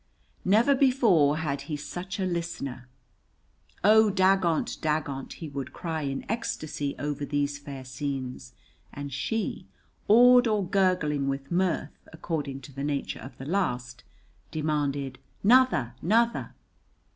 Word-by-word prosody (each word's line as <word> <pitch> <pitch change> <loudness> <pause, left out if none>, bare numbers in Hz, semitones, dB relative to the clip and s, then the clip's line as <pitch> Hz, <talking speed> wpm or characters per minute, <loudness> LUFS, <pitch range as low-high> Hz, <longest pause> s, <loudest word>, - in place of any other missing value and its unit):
Never 220 +9 +4
before 230 - +4
had 140 -3 -2
he 150 - -2
such 180 +6 -6
a 190 - 0
listener. 165 -8 -4 1.0
"Oh, 215 +2 +6
dagont, 190 -4 +2
dagont!" 150 -3 -2
he 160 - -7
would 140 -2 -6
cry 160 -2 -3
in 135 -2 -3
ecstasy 155 -10 -3
over 145 +1 -3
these 145 0 -1
fair 140 -2 -8
scenes, 130 -1 -5 0.4
and 145 -1 -7
she, 220 - -2 0.4
awed 245 +3 +7
or 210 -4 +1
gurgling 180 -7 +1
with 135 +1 -3
mirth 175 -4 0
according 150 -4 -4
to 140 - -12
the 140 +1 -5
nature 145 -1 -2
of 130 +5 -10
the 135 - -8
last, 125 -8 -2 0.5
demanded 145 -4 -2 0.2
"'Nother, 225 - +4
'nother!" 230 +6 +1
150 Hz, 125 wpm, -27 LUFS, 140-190 Hz, 1.0 s, awed